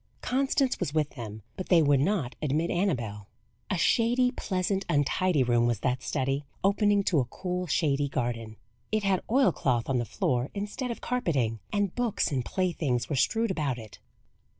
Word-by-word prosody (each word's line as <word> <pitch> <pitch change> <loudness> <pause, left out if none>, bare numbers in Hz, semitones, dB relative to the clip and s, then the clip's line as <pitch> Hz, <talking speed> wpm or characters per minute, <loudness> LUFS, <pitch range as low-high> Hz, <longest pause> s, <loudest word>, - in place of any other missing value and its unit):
Constance 270 +1 +1
was 140 - -2
with 150 -2 +1
them, 110 -4 -8
but 185 - -6
they 175 - +6
would 145 -2 +4
not 150 -5 0
admit 155 +3 0
Annabel. 120 - -1 0.4
A 190 - 0
shady, 245 +7 +3
pleasant, 190 -4 -1
untidy 150 0 +2
room 120 -1 +3
was 120 -2 -1
that 125 0 0
study, 135 +1 -1 0.2
opening 205 +1 +3
to 165 -5 +2
a 130 - +1
cool, 180 +7 -4
shady 145 -3 +1
garden. 115 -4 -3 0.4
It 215 -1 +1
had 195 -2 +2
oil 265 +3 +4
cloth 120 -3 0
on 130 -2 +1
the 120 - -1
floor 125 +3 -1
instead 210 +5 -3
of 235 - -5
carpeting, 140 - 0
and 205 -3 0
books 240 -9 0
and 130 -3 0
playthings 150 -10 -1
were - - 0
strewed 225 - +1
about 145 -8 -1
it. 110 -3 -11
155 Hz, 175 wpm, -28 LUFS, 125-200 Hz, 0.4 s, they